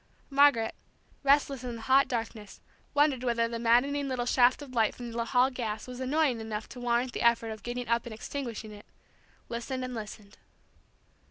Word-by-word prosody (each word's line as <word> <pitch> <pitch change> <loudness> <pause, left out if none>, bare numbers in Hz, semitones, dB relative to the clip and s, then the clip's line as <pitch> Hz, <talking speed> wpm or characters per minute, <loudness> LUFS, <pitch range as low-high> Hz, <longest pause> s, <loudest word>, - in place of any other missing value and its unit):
Margaret, 275 -5 +4 0.5
restless 280 -2 +2
in 245 -2 -4
the 225 - -9
hot 270 +2 +4
darkness, 225 -3 -5 0.4
wondering 290 -3 +3
whether 235 -2 +1
the 230 0 -4
maddening 265 +5 +2
little 255 -2 -2
shaft 250 +3 +3
of 265 -3 -11
light 225 -3 +2
from 240 -1 -7
the 230 0 -2
hall 250 +2 +3
gas 220 -4 -4
was 250 0 -8
annoying 260 -2 +1
enough 220 -1 -5
to 250 - -9
warrant 245 +1 0
the - - -3
effort 235 -1 +3
of 215 -1 -8
getting 245 +2 -4
up 235 +1 0
and 230 - -6
extinguishing 230 -3 -6
it, 205 0 -13 0.6
listened 255 +2 -4
and 255 - -6
listened. 210 -2 -8
240 Hz, 180 wpm, -29 LUFS, 230-260 Hz, 0.6 s, Margaret